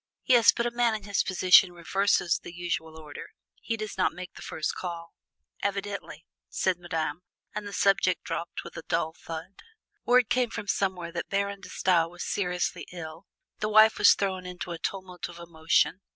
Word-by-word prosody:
"Yes, 240 -3 +7
but 235 - -2
a 240 - 0
man 235 -2 +2
in 215 - -6
his 200 -1 +1
position 185 0 +5
reverses 175 0 +1
the - - -9
usual 170 -2 -4
order: 150 -2 -9 0.3
he 225 - -2
does 215 -3 -6
not 185 - +2
make 180 0 -8
the - - -12
first 155 - -3
call!" 170 -2 -6 0.5
"Evidently!" 200 0 -4 0.2
said 185 - 0
Madame, 165 -2 -3 0.3
and 210 -1 -4
the - - -7
subject 195 0 +2
dropped - - -4
with - - -11
a - - -5
dull 160 - 0
thud. 165 +4 -8 0.4
Word 245 -1 +4
came 250 0 +1
from 210 -2 -6
somewhere 185 -4 -1
that 170 0 -5
Baron 200 0 -1
De - - -10
Stael 170 -3 +2
was 175 +1 -7
seriously 180 -3 -2
ill. 165 +1 -9 0.3
The 210 - -1
wife 215 +1 +6
was - - +7
thrown 190 -2 -2
into 180 0 -6
a 170 - -5
tumult 185 -3 -5
of 170 - -11
emotion. 170 +2 +1
185 Hz, 180 wpm, -28 LUFS, 170-200 Hz, 0.5 s, Yes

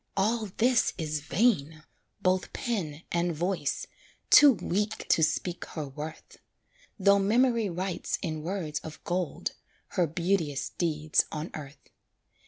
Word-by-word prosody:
All 215 +3 +1
this 240 0 +3
is 155 -3 -2
vain! 155 - +1 0.4
both 185 0 +1
pen 170 -10 -3
and 170 -1 0
voice, 180 +4 -1 0.5
Too 290 -2 +9
weak 205 +2 -2
to - - +4
speak 170 +3 0
her 155 -3 -5
worth; 150 +4 -8 0.6
Though 200 0 +5
memory 230 +1 +3
writes 180 +1 -2
in 155 -2 -3
words 165 -3 -3
of 155 -1 -10
gold, 180 -1 -2 0.4
Her 175 -2 +1
beauteous 165 -3 -1
deeds 155 -3 +1
on 155 +2 -5
earth. 140 -2 -10
175 Hz, 125 wpm, -28 LUFS, 155-200 Hz, 0.6 s, Too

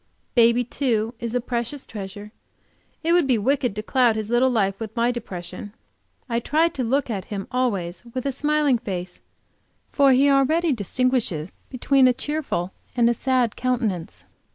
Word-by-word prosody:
Baby, 235 0 +4
too, 235 -3 -1
is 235 0 -4
a - - +3
precious 240 +3 -4
treasure; 205 0 -8 0.7
it 335 +1 +2
would 345 -5 +4
be 250 -3 +3
wicked 250 0 0
to 215 - -4
cloud 245 -1 +3
his 220 0 -4
little 245 +2 +4
life 195 -5 0
with 220 -1 -6
my 235 +1 +2
depression. 190 -3 -7 0.5
I 235 -2 0
try 310 +7 +2
to 265 - -4
look 255 +2 0
at 195 -4 -3
him 200 -2 -5
always 205 -9 -1
with 255 - -3
a 275 - +1
smiling 295 -2 +1
face, 180 -5 -6 0.7
for 280 -2 +4
he 265 +2 +5
already 290 +4 +3
distinguishes 220 -6 -1 0.2
between 265 +1 +3
a 250 - +4
cheerful 265 - -3 0.3
and 235 -1 +4
a - - +2
sad 250 -2 0
countenance. 230 -9 -2
240 Hz, 165 wpm, -23 LUFS, 210-265 Hz, 0.7 s, he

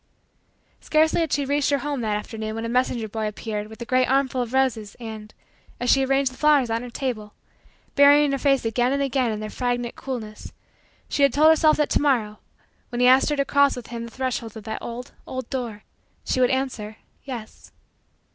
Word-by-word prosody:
Scarcely 315 +2 +2
had 325 -3 -1
she 285 -1 +1
reached 285 +1 +1
her 285 - +3
home 285 -2 -3
that 215 -2 0
afternoon 220 0 -5
when 225 +1 -4
a - - -3
messenger 245 -2 0
boy 215 +1 -3
appeared 210 0 -4
with 220 0 -13
a - - -10
great 255 +1 +2
armful 265 -1 +1
of 240 -2 -4
roses 245 -6 0
and, 220 -2 -8 0.5
as 245 0 +2
she 270 - +4
arranged 270 0 +1
the - - -15
flowers 290 -6 +3
on 230 +1 0
her 245 - -7
table, 235 -5 -4 0.6
burying 285 0 +6
her 275 - -1
flushed 275 -1 +2
face - - -11
again 240 +3 +1
and 280 0 0
again 265 -3 0
in 215 0 -4
their 215 - -5
fragrant 245 -1 -2
coolness, 225 -5 -7 0.5
she - - -2
had 280 - +5
told 305 +2 +5
herself 315 -1 +5
that 300 - 0
to - - +2
morrow, 230 -8 +1 0.5
when 240 - -4
he 250 - +4
asked 260 +3 +6
her 295 - +1
to 280 -1 0
cross 280 0 +3
with 245 -2 -9
him 235 -1 -5
the - - -9
threshold 240 -3 -4
of 220 - -9
that 220 +1 -5
old, 240 +1 -7 0.2
old 260 -2 -5
door, 235 -5 -4 0.4
she - - 0
would 250 - +4
answer: 245 -5 -2 0.3
yes. 240 -5 -9
250 Hz, 215 wpm, -24 LUFS, 225-275 Hz, 0.6 s, burying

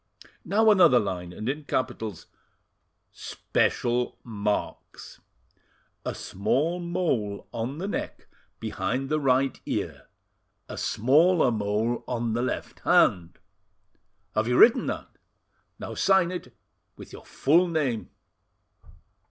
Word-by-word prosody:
"Now 220 +2 +4
another 180 -11 +6
line, 90 -5 -2
and 110 +5 -7
in 145 +3 -3
capitals: 110 - -3 0.9
"'SPECIAL 120 +1 -1
MARKS.' 105 -3 -4 0.8
"'A - - -4
small 140 - -1
mole 170 - -2
on 120 +5 -4
the 185 +4 -4
neck - - -5 0.3
behind 135 +1 -3
the 155 - +1
right 135 -1 +1
ear, - - -4 0.6
a - - -7
smaller 150 - +3
mole 110 +2 -1
on 120 -2 -2
the 120 - 0
left 125 - -4
hand.' 85 -2 +2 1.0
"Have 110 +1 0
you 125 +1 +2
written 230 - +6
that? - - -6 0.6
Now - - -7
sign 190 -3 +3
it 180 - -7 0.4
with - - -12
your - - -10
full 170 +6 +2
name." 145 -9 -1
125 Hz, 110 wpm, -26 LUFS, 110-165 Hz, 1.0 s, another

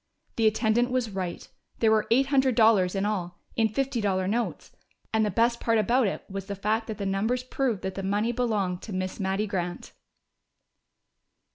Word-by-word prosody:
The 225 -1 +3
attendant 220 +2 +2
was 250 -3 -1
right! 185 -3 -4 0.3
There 220 -1 +3
were 215 -1 +2
eight 255 +4 +4
hundred 265 -3 +3
dollars 215 -5 +4
in 195 +1 0
all, 180 -4 -2 0.2
in 225 -1 +3
fifty 260 +1 -1
dollar 190 -2 0
notes. 230 +4 -2 0.4
And 220 0 +3
the 210 - +1
best 235 +4 +2
part 230 -1 +2
about 235 +3 +3
it - - -3
was 195 0 -6
the 200 - -4
fact 215 +3 -1
that 220 - -5
the 200 - -4
numbers 215 +6 0
proved 255 -5 -1
that 190 - -3
the 195 - -5
money 205 +4 0
belonged 210 -7 -1
to 215 - -7
Miss 185 0 -3
Mattie 195 +2 0
Grant! 180 -4 -4
215 Hz, 185 wpm, -27 LUFS, 195-235 Hz, 0.4 s, eight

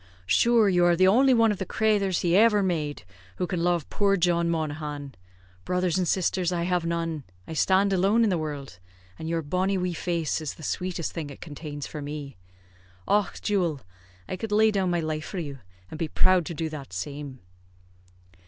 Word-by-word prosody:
"Shure 225 - +4
you 180 -2 +3
are 175 0 +4
the 185 +2 +4
only 260 +7 +5
one 230 -3 +5
of 205 - -3
the - - -1
crathers 205 -4 +1
he 175 0 +2
ever 210 0 +5
made 155 - -2 0.3
who 180 - -1
can 175 -2 -2
love 175 -3 +1
poor 200 -1 +2
John 170 -1 +2
Monaghan. 150 -3 -3 0.5
Brothers 180 - 0
and 180 - 0
sisters 185 -1 +1
I 170 -1 -1
have 180 -1 0
none 165 -3 -2 0.2
I - - -6
stand 190 +5 +3
alone 195 +5 +3
in 215 - +2
the 180 - +1
wurld, 145 - -6 0.4
and 160 - -5
your 165 -1 -1
bonny 185 +6 0
wee 180 -1 -1
face 170 -2 -1
is 155 - -4
the 155 - -13
sweetest 180 0 -2
thing 160 -4 -5
it 140 - -11
contains 145 -2 -7
for 150 - -7
me. 145 -1 -6 0.7
Och, 205 -2 +1
jewil! 175 -9 0 0.5
I 185 - -4
could 220 +2 -5
lay 215 +1 +5
down 195 -3 0
my 175 -1 +1
life 155 -1 -3
for - - -6
you, 145 -5 -5 0.3
and 155 - -7
be 165 - -1
proud 185 +1 +3
to 170 - -5
do 160 +1 -2
that 140 -9 -8
same." 140 +8 -6
175 Hz, 195 wpm, -26 LUFS, 155-190 Hz, 0.7 s, only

